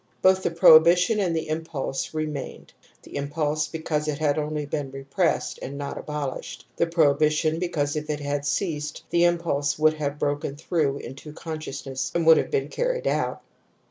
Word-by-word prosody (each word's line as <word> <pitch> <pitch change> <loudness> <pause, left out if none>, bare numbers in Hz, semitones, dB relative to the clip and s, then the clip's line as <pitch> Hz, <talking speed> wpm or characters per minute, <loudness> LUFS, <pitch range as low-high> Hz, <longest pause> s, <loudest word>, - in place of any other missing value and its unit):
Both 190 0 +5
the - - 0
prohibition 170 +5 +6
and 180 -4 +1
the 160 - -2
impulse 155 -4 -3
remained; 155 -3 -5 0.3
the - - -12
impulse 150 +1 -1
because 155 -1 -2
it 150 -2 -1
had 150 -1 +1
only 150 0 -2
been 145 -1 -3
repressed 135 +6 -1
and 140 +2 -6
not 140 -1 -4
abolished, 150 -3 -5
the 170 - +1
prohibi 155 -3 +3
tion, 155 +1 0
because 155 -5 -1
if 150 0 -4
it 150 -1 -1
had 145 0 -2
ceased 150 -1 -2
the 170 0 +4
impulse 155 -5 +1
would 155 0 +4
have 150 -2 -3
broken 145 0 -2
through 150 -2 0
into 140 +3 -9
consciousness 150 -5 -5
and 170 -1 +1
would 160 0 +8
have - - 0
been 430 -2 -1
carried - - -1
out. - - -1
155 Hz, 175 wpm, -25 LUFS, 145-165 Hz, 0.3 s, would